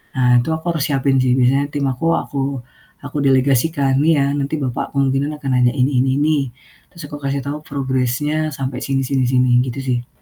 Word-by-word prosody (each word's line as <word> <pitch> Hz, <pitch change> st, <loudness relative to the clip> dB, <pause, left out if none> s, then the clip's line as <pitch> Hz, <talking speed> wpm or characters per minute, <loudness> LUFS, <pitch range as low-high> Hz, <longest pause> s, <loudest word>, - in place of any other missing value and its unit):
Nah, 125 Hz, -1 st, +4 dB
itu -, -, -7 dB
aku 160 Hz, -, -9 dB
harus 155 Hz, -4 st, -1 dB
siapin 135 Hz, -1 st, +1 dB
sih 125 Hz, 0 st, +2 dB
Biasanya 135 Hz, +3 st, +2 dB
tim 145 Hz, -1 st, -2 dB
aku 165 Hz, +6 st, 0 dB
aku 135 Hz, +1 st, -6 dB
delegasikan, 135 Hz, +1 st, +2 dB
"Nih 160 Hz, +1 st, +4 dB
ya, 140 Hz, -, +2 dB
nanti 145 Hz, +2 st, -2 dB
Bapak 130 Hz, +1 st, -4 dB
kemungkinan 140 Hz, +2 st, +1 dB
akan 140 Hz, -2 st, -5 dB
nanya 125 Hz, 0 st, +3 dB
ini 130 Hz, -1 st, +1 dB
ini 135 Hz, -, +1 dB
ini," 155 Hz, 0 st, +2 dB, 0.5 s
terus 170 Hz, -3 st, -11 dB
aku 145 Hz, -, -7 dB
kasih 140 Hz, 0 st, -2 dB
tahu 145 Hz, +2 st, -4 dB
progress-nya 140 Hz, +3 st, -1 dB
sampai 130 Hz, -1 st, -4 dB
sini 135 Hz, -1 st, -1 dB
sini 130 Hz, -1 st, 0 dB
sini, 125 Hz, -1 st, +2 dB
gitu 130 Hz, +2 st, -5 dB
sih. 125 Hz, -2 st, -2 dB
135 Hz, 190 wpm, -19 LUFS, 130-145 Hz, 0.5 s, Nah